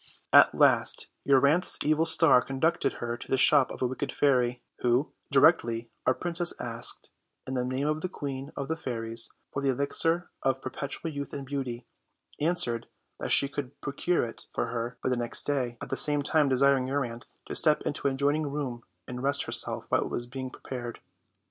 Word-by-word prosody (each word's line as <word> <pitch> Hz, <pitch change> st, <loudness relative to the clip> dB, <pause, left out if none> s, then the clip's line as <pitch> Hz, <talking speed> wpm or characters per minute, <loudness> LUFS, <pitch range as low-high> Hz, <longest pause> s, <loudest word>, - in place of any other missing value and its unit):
At -, -, +7 dB
last -, -, +3 dB, 0.2 s
Euryanthe's 140 Hz, +6 st, +3 dB
evil 155 Hz, +2 st, +2 dB
star 160 Hz, -6 st, +5 dB
conducted 135 Hz, +7 st, 0 dB
her 120 Hz, 0 st, -4 dB
to -, -, -10 dB
the 135 Hz, -, +1 dB
shop 130 Hz, +1 st, +5 dB
of -, -, -5 dB
a -, -, +3 dB
wicked 130 Hz, +1 st, -3 dB
fairy, 125 Hz, -3 st, +1 dB, 0.2 s
who, 125 Hz, +4 st, +1 dB, 0.2 s
directly 120 Hz, -6 st, +3 dB, 0.2 s
our 130 Hz, -, +4 dB
princess 175 Hz, 0 st, -3 dB
asked, 115 Hz, 0 st, -3 dB, 0.3 s
in 130 Hz, -, -5 dB
the 125 Hz, -1 st, 0 dB
name 130 Hz, +3 st, -2 dB
of 155 Hz, +1 st, -1 dB
the 185 Hz, -, -3 dB
Queen 140 Hz, -4 st, -6 dB
of 140 Hz, -1 st, -3 dB
the 160 Hz, -, -1 dB
Fairies, 115 Hz, -6 st, -1 dB, 0.2 s
for 140 Hz, -, -2 dB
the 140 Hz, -, +1 dB
elixir 165 Hz, +6 st, 0 dB
of 135 Hz, 0 st, 0 dB
per 130 Hz, -, -6 dB
petual 150 Hz, +3 st, -5 dB
youth 140 Hz, 0 st, -6 dB
and 140 Hz, -1 st, -5 dB
beauty, 130 Hz, -3 st, -4 dB, 0.5 s
answered 145 Hz, -8 st, +2 dB, 0.3 s
that -, -, -4 dB
'she 140 Hz, -, +6 dB
could 140 Hz, -1 st, -6 dB
pro 140 Hz, -, -5 dB
cure 175 Hz, +4 st, +1 dB
it 115 Hz, -1 st, -8 dB
for 115 Hz, -, -1 dB
her 120 Hz, 0 st, -4 dB
by -, -, +1 dB
the 125 Hz, -, +1 dB
next 120 Hz, -1 st, -3 dB
day, 125 Hz, -5 st, -1 dB
at -, -, -8 dB
the -, -, +1 dB
same 145 Hz, -1 st, +3 dB
time 150 Hz, -1 st, +2 dB
desiring 135 Hz, 0 st, +3 dB
Euryanthe 125 Hz, -4 st, -3 dB, 0.2 s
to -, -, -6 dB
step 155 Hz, -2 st, +4 dB
into 140 Hz, -, -2 dB
an 135 Hz, -, 0 dB
adjoining 145 Hz, +3 st, +1 dB
room 140 Hz, -4 st, -4 dB, 0.3 s
and 125 Hz, 0 st, -6 dB
rest 140 Hz, +1 st, 0 dB
her -, -, -7 dB
self -, -, +2 dB
while -, -, +2 dB
it -, -, -3 dB
was 120 Hz, -, -3 dB
being 130 Hz, +1 st, -6 dB
prepared. 120 Hz, -2 st, -7 dB
135 Hz, 200 wpm, -28 LUFS, 125-145 Hz, 0.5 s, At